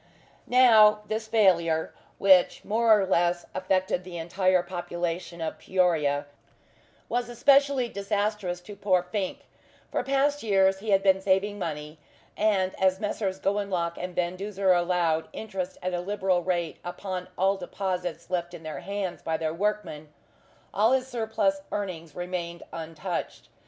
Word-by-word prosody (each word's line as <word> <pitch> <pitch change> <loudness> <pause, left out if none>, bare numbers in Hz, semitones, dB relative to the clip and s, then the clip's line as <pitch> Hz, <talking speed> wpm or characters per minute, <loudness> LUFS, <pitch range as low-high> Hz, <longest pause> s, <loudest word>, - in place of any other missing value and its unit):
Now, 220 -4 +6
this 220 +1 -3
failure, 170 -7 +2 0.2
which 190 -2 +4
more 220 0 +4
or 195 - +1
less 175 -1 +1
affected 185 -1 0
the 180 -1 -8
entire 185 +2 +1
population 175 -1 -4
of 160 - -4
Peoria, 160 -7 +1 0.8
was 245 0 -1
especially 275 +1 +3
disastrous 200 -3 -2
to 205 +3 -10
poor 190 -3 +2
Fink. 185 +1 -3 0.5
For - - 0
past 280 +2 +1
years 195 -3 +3
he 215 +2 -6
had 195 -1 +4
been 190 -1 +4
saving 200 +2 +1
money, 150 -2 -5 0.4
and 195 -3 +1
as 190 0 +3
Messrs. 200 -2 -2
Gowanlock 195 -4 -1
and 180 0 -5
Van 175 0 0
Duzer 195 -1 +1
allowed 175 -2 +1
interest 190 -4 -5
at 185 0 -2
a 175 - -1
liberal 190 -1 0
rate 175 -2 -2
upon 180 +1 -5
all 195 +1 +3
deposits 180 -3 -4
left 175 -1 -2
in 165 - -11
their 155 -3 -5
hands 195 +1 -4
by 160 -1 -1
their 160 -1 -2
workmen, 165 -6 -3 0.6
all 220 +5 +3
his 260 -1 +2
surplus 220 -5 0
earnings 170 -7 -5
remained 175 -1 -4
untouched. 165 +2 -5
185 Hz, 140 wpm, -27 LUFS, 175-205 Hz, 0.8 s, Now